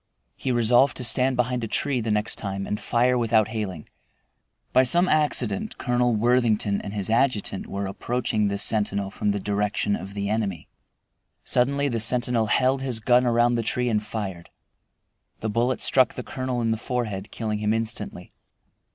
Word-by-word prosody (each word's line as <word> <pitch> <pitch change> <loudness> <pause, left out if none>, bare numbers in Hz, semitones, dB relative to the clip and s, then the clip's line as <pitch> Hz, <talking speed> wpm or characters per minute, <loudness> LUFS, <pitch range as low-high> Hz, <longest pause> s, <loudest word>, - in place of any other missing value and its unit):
He 130 - -3
resolved 120 +3 +3
to 125 - -4
stand 125 +3 +3
behind 125 0 0
a - - -2
tree 135 +3 0
the 115 - -3
next 105 0 0
time 95 -1 -4
and 105 - -3
fire 125 +1 +1
without 110 -2 +2
hailing. 100 -8 -5 0.9
By 130 - +6
some 175 +8 +3
accident 140 - +1
Colonel 120 -1 +1
Worthington 110 -3 +2
and 100 - -7
his 100 -2 0
adjutant 115 -4 0
were 100 0 -4
approaching 110 +1 -1
this 100 0 -1
sentinel 100 -2 -1
from 105 - -2
the 100 0 0
direction 105 +1 -1
of 100 +1 -8
the 100 -1 -2
enemy. 100 -6 -2 0.8
Suddenly 140 +3 +1
the 120 -4 -1
sentinel 120 0 +3
held 130 +4 +2
his 130 -4 -2
gun 125 +2 +3
around 120 0 +3
the 120 - 0
tree 125 +2 -1
and 105 -2 +1
fired. 95 -6 -6 0.9
The 110 - -2
bullet 120 +4 0
struck 130 -2 +3
the 125 - -5
colonel 130 -1 -3
in 115 -1 0
the 110 - 0
forehead, 110 -4 -3
killing 110 -2 -3
him 105 0 0
instantly. 115 0 -3
115 Hz, 170 wpm, -24 LUFS, 105-125 Hz, 0.9 s, By